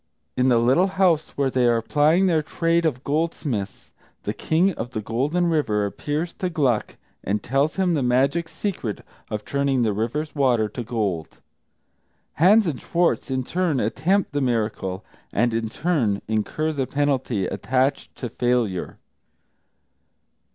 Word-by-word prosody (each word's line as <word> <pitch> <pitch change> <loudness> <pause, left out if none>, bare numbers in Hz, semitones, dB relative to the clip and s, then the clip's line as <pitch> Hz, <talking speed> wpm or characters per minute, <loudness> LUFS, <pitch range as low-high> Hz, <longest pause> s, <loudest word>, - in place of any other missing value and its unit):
In 130 +1 +3
the 120 - +4
little 130 +11 +4
house 175 -5 +3
where 140 -2 +1
they 125 -1 +2
are 120 -1 +3
plying 155 +9 +3
their 165 -4 +3
trade 165 +2 +1
of 130 -4 -3
goldsmiths, 140 - -2 0.3
the - - -2
King 175 +5 +2
of 125 -3 -6
the 110 - -2
Golden 135 - 0
River 145 -11 +1
appears 150 - -3
to 185 - -3
Gluck 135 -10 0 0.3
and 105 +2 -1
tells 140 +4 +1
him 185 -2 +1
the 150 - +1
magic 135 +7 +1
secret 170 - -4 0.2
of 105 -1 -4
turning 140 -3 +1
the 110 -2 +1
river's 120 +9 -2
waters 120 -7 +2
to 120 - -4
gold. 105 -8 -3 1.0
Hans 205 +7 +5
and 155 -7 -3
Schwartz 170 -3 0
in 130 -1 -1
turn 170 -1 0
attempt 180 - +1
the 145 0 -1
miracle, 110 -6 -1 0.3
and 120 +2 +1
in 115 -1 -1
turn 120 - 0
incur 110 +9 -1
the 135 -4 -2
penalty 135 -8 0
attached 130 +7 -1
to 125 - -5
failure. 120 -6 -1
135 Hz, 150 wpm, -23 LUFS, 115-160 Hz, 1.0 s, Hans